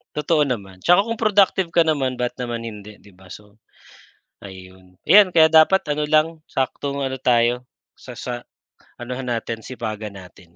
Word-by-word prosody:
Totoo 150 Hz, +1 st, +1 dB
naman. 100 Hz, -9 st, -4 dB
Tsaka 180 Hz, +4 st, +4 dB
kung 230 Hz, -, -2 dB
productive 200 Hz, -4 st, +2 dB
ka 170 Hz, -1 st, +3 dB
naman, 135 Hz, -5 st, -1 dB
ba't 125 Hz, 0 st, -2 dB
naman 120 Hz, -2 st, -5 dB
hindi, 105 Hz, -1 st, -10 dB
'di 100 Hz, -, -20 dB
ba? 95 Hz, 0 st, -18 dB
So 105 Hz, +2 st, -14 dB, 0.8 s
ayun. 95 Hz, -1 st, -14 dB
Ayan, 205 Hz, -1 st, +7 dB
kaya 160 Hz, -1 st, +5 dB
dapat 160 Hz, +4 st, +5 dB
ano 150 Hz, 0 st, -2 dB
lang, 155 Hz, +1 st, +1 dB
saktong 140 Hz, +1 st, -3 dB
ano 130 Hz, -1 st, -4 dB
tayo 125 Hz, 0 st, +1 dB, 0.2 s
sa 125 Hz, -2 st, -13 dB
sa 120 Hz, 0 st, -5 dB, 0.6 s
anohan 125 Hz, +2 st, -6 dB
natin, 115 Hz, -1 st, -3 dB
sipagan 110 Hz, -4 st, -6 dB
natin. 90 Hz, -2 st, -15 dB
125 Hz, 160 wpm, -21 LUFS, 105-155 Hz, 0.8 s, Ayan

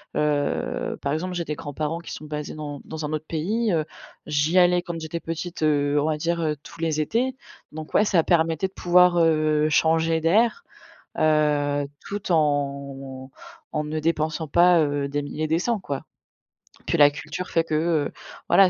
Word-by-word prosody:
Heu, 145 Hz, -1 st, -1 dB
par 140 Hz, -, -1 dB
exemple 175 Hz, +5 st, -2 dB
j'ai 175 Hz, -1 st, -2 dB
des 150 Hz, -, -3 dB
grands-parents 150 Hz, +3 st, -4 dB
qui 170 Hz, -, -8 dB
sont -, -, -8 dB
basés 150 Hz, 0 st, -5 dB
dans 150 Hz, -2 st, -6 dB
dans 160 Hz, -1 st, -5 dB
un 150 Hz, -, -4 dB
autre 155 Hz, 0 st, -3 dB
pays. 205 Hz, +7 st, 0 dB
Heu, 160 Hz, -2 st, +2 dB, 0.4 s
j'y 150 Hz, +4 st, +1 dB
allais 180 Hz, 0 st, +4 dB
quand 170 Hz, -1 st, -6 dB
j'étais 160 Hz, +1 st, -5 dB
petite, 165 Hz, +1 st, -5 dB
heu, 145 Hz, -1 st, +2 dB
on 145 Hz, -, 0 dB
va 155 Hz, 0 st, +1 dB
dire, 170 Hz, +2 st, -1 dB
heu, 155 Hz, -2 st, 0 dB
tous 170 Hz, -, -13 dB
les 160 Hz, -2 st, 0 dB
étés 245 Hz, -, 0 dB, 0.4 s
donc 155 Hz, 0 st, -8 dB
ouais, 210 Hz, -, +4 dB
ça 175 Hz, -5 st, +3 dB
permettait 165 Hz, +1 st, +2 dB
de -, -, -33 dB
pouvoir, 180 Hz, -1 st, +4 dB
heu, 155 Hz, -2 st, +3 dB
changer 160 Hz, +1 st, +2 dB
d'air. 220 Hz, -, +2 dB, 0.6 s
Heu, 145 Hz, -2 st, +2 dB, 0.2 s
tout 200 Hz, -1 st, -5 dB
en 140 Hz, -3 st, -1 dB, 0.4 s
en 150 Hz, -1 st, -1 dB
ne 155 Hz, +1 st, -3 dB
dépensant 160 Hz, 0 st, -1 dB
pas, 175 Hz, +2 st, +5 dB
heu, 145 Hz, -2 st, 0 dB
des 145 Hz, +1 st, -2 dB
mille 145 Hz, +1 st, -7 dB
et 155 Hz, -, +1 dB
des 160 Hz, +1 st, +1 dB
cents 230 Hz, +5 st, 0 dB
quoi. 140 Hz, -6 st, -5 dB, 0.8 s
Puis -, -, +1 dB
la 145 Hz, 0 st, +7 dB
culture 155 Hz, +5 st, -6 dB
fait 165 Hz, -, +2 dB
que, 160 Hz, -1 st, -2 dB
heu, 155 Hz, -1 st, +1 dB, 0.4 s
voilà 195 Hz, -1 st, +6 dB
155 Hz, 185 wpm, -24 LUFS, 150-170 Hz, 0.8 s, la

